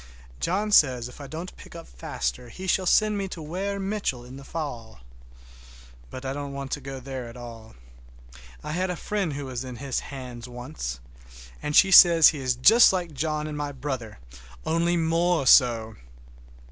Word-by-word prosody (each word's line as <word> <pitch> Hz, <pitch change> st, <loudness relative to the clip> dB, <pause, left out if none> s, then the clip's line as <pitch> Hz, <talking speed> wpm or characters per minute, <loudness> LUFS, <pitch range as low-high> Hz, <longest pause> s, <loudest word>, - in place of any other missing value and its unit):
John 205 Hz, +5 st, -1 dB
says 125 Hz, -, +4 dB
if 125 Hz, -, -12 dB
I 140 Hz, -, -8 dB
don't 165 Hz, +5 st, -7 dB
pick -, -, -13 dB
up -, -, -10 dB
faster -, -, -5 dB
he 185 Hz, +10 st, -9 dB
shall 185 Hz, 0 st, +1 dB
send 210 Hz, +1 st, +3 dB
me 195 Hz, -, -2 dB
to 180 Hz, -, -8 dB
Weir 185 Hz, +6 st, -4 dB
Mitchell 195 Hz, -, -3 dB
in 125 Hz, +2 st, -11 dB
the 135 Hz, -, -10 dB
fall. 120 Hz, -, -6 dB, 1.1 s
But 130 Hz, +1 st, -9 dB
I 135 Hz, -, -2 dB
don't 140 Hz, 0 st, -6 dB
want 140 Hz, 0 st, -6 dB
to 145 Hz, -, -3 dB
go 135 Hz, 0 st, -7 dB
there 130 Hz, -1 st, -6 dB
at 115 Hz, +1 st, -11 dB
all. 115 Hz, -2 st, -11 dB, 0.9 s
I 150 Hz, -, -5 dB
had 180 Hz, +3 st, -1 dB
a 180 Hz, -, -2 dB
friend 195 Hz, -1 st, -2 dB
who 140 Hz, 0 st, -5 dB
was 130 Hz, -1 st, -5 dB
in 130 Hz, -1 st, -7 dB
his 135 Hz, +1 st, -3 dB
hands 125 Hz, -3 st, -9 dB
once, 120 Hz, -, -6 dB, 0.6 s
and 150 Hz, 0 st, -3 dB
she 195 Hz, -, +6 dB
says 170 Hz, -3 st, +9 dB
he 150 Hz, -, -4 dB
is 130 Hz, -2 st, 0 dB
just 225 Hz, -, +7 dB
like 175 Hz, -4 st, -3 dB
John 150 Hz, +2 st, -2 dB
and 155 Hz, -1 st, -5 dB
my 145 Hz, -1 st, -3 dB
brother, 130 Hz, -5 st, -5 dB, 0.5 s
only 170 Hz, +2 st, +1 dB
more 165 Hz, -1 st, +1 dB
so! 115 Hz, -4 st, +4 dB
140 Hz, 185 wpm, -25 LUFS, 125-170 Hz, 1.1 s, says